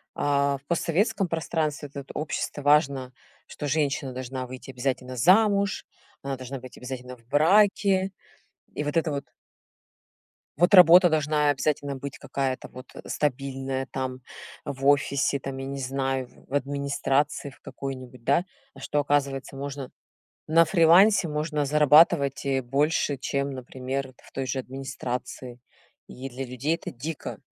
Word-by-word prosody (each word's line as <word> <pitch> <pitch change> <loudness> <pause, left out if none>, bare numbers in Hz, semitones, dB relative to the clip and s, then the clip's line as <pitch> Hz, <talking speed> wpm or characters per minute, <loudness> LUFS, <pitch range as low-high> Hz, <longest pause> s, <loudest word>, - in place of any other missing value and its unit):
а, 140 -1 +1
в 140 - -24
постсоветском 185 +5 0
пространстве 155 -3 -2
этот 140 -1 -9
общество 150 -1 -3
важно, 140 -3 +2 0.3
что 145 - -6
женщина 140 -3 0
должна 130 0 -5
выйти 130 +1 -9
обязательно 130 0 -3
замуж, 200 - +3 0.4
она 135 -1 -3
должна 130 +1 -6
быть 130 0 -12
обязательно 125 0 -7
в 115 -1 -25
браке. 190 - +3 0.6
И 150 - -3
вот 150 +2 -1
это 160 -2 +1
вот 140 0 -3 1.3
вот 175 +4 +3
работа 180 -1 +9
должна 150 -1 +2
обязательно 145 0 0
быть 140 +1 -7
какая-то 135 -2 -3
вот, 130 +1 -11
э, - - -9
стабильная, 135 -1 -2
там, 130 -1 -3 0.5
в 135 0 -5
офисе, 140 -1 +2
там, 135 0 -6
я 135 - -5
не 140 0 -5
знаю, 135 -1 -2 0.2
в 135 - -12
администрации 140 +1 0
в 130 - -18
какой-нибудь, 130 -3 -7
да. 140 +8 +3 0.3
А - - -14
что 150 - -1
оказывается 140 -1 0
можно 140 -1 -6 0.6
на 165 +2 +5
фрилансе 175 +3 +5
можно 150 0 -1
зарабатывать, 150 -1 +4
э, 135 -1 +1
больше, 140 +3 +1
чем, 140 +1 -2
например, 130 +1 -5
в - - -19
той 135 -1 -3
же 135 - -2
администрации. 130 -2 -6 0.5
И 130 +2 -7
для 130 +2 -5
людей 130 +6 -1
это - - -7
дико. 145 +6 -6
140 Hz, 140 wpm, -26 LUFS, 130-150 Hz, 1.3 s, работа